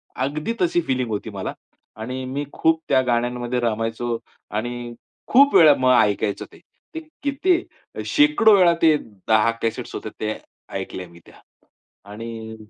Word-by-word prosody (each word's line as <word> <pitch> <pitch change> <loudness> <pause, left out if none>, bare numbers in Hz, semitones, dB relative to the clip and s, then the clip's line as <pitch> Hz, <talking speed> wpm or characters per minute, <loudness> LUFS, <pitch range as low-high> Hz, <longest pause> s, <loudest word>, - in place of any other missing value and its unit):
अगदी 150 - -2
तशी 175 -1 +2 0.3
होती 110 0 -4
मला 100 -3 -5 0.5
आणि 130 +3 -4
मी 140 +3 -3
खूप 160 0 +2
त्या 130 - +4
गाण्यांमध्ये 120 +1 -1
रमायचो 115 0 -2 0.3
आणि 120 +2 -4 0.3
खूप 280 +3 +5
वेळा 155 -3 +8
मग 130 0 +4
ऐकायचं 105 0 -1
ते. - - -16 0.4
ते - - -2 0.2
किती 340 +6 +1 0.4
शेकडो 295 -8 +5
वेळा 175 -3 +5
ते 160 -2 +6
10 110 0 0
कॅसेट्स 115 -1 -3
होते - - -5
ते 110 0 -1 0.4
ऐकल्या 90 -1 -5
मी 85 0 -16
त्या - - -17 0.8
आणि 110 +1 -7
120 Hz, 135 wpm, -22 LUFS, 110-160 Hz, 0.8 s, वेळा